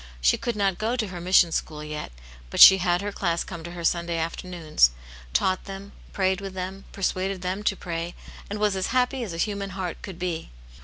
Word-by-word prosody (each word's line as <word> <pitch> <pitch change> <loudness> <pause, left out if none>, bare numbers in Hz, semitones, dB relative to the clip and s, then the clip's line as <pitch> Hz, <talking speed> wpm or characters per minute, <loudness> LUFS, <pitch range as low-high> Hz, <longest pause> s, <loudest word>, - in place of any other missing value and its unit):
She - - +4
could 240 - -3
not 195 -3 0
go 225 +3 0
to 220 -5 -2
her 180 -2 -7
mission 180 -1 +5
school 150 -1 -3
yet, 150 - -6 0.4
but - - -4
she 190 0 +11
had 180 +1 +1
her 205 - -2
class 170 -4 -1
come 170 -3 -8
to 170 +1 -7
her 175 -1 -7
Sunday 170 0 0
after 165 +3 -3
noons, 160 - +3 0.4
taught 185 - +1
them, 195 0 -8 0.2
prayed 190 0 0
with 195 -1 -7
them, 190 +1 -5
persuaded 190 -1 -2
them 185 +3 -2
to 205 -1 +1
pray, 170 -1 -5 0.3
and 205 - -3
was 210 -1 +1
as 190 -1 -1
happy 255 +1 +1
as 210 - -5
a 165 - -5
human 200 +2 -2
heart 180 -3 -4
could 190 -4 -8
be. 175 -2 -3
185 Hz, 215 wpm, -25 LUFS, 170-195 Hz, 0.4 s, she